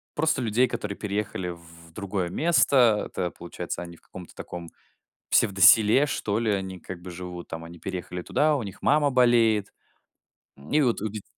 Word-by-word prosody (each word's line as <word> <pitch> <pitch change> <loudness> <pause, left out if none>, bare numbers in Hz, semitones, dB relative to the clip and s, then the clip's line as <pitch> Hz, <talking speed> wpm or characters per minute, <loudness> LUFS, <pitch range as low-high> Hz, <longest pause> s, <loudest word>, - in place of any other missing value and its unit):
просто 155 -2 +1
людей, 120 +2 +2
которые 105 -4 -5
переехали 100 -3 -3
в 85 -1 -12
другое 95 -2 -3
место. 125 - +3
Это, 90 -1 -3
получается, 85 0 -6
они 85 -1 -11
в - - -25
каком-то 90 -2 -12
таком 85 -1 -8 0.6
псевдоселе, 105 +5 +5
что 110 -6 -1
ли, 115 -2 0
они 95 -2 -3
как 90 - -8
бы 90 - -9
живут 90 0 -8
там. 80 0 -7
Они 85 +1 -11
переехали 90 0 -5
туда, 150 - +1
у 130 - -4
них 100 -2 -9
мама 145 -1 +3
болеет. 115 -5 +3 1.0
И 155 - +3
вот 120 -7 +1
у 110 - -1
дет 105 -1 -7
100 Hz, 170 wpm, -26 LUFS, 90-120 Hz, 1.0 s, псевдоселе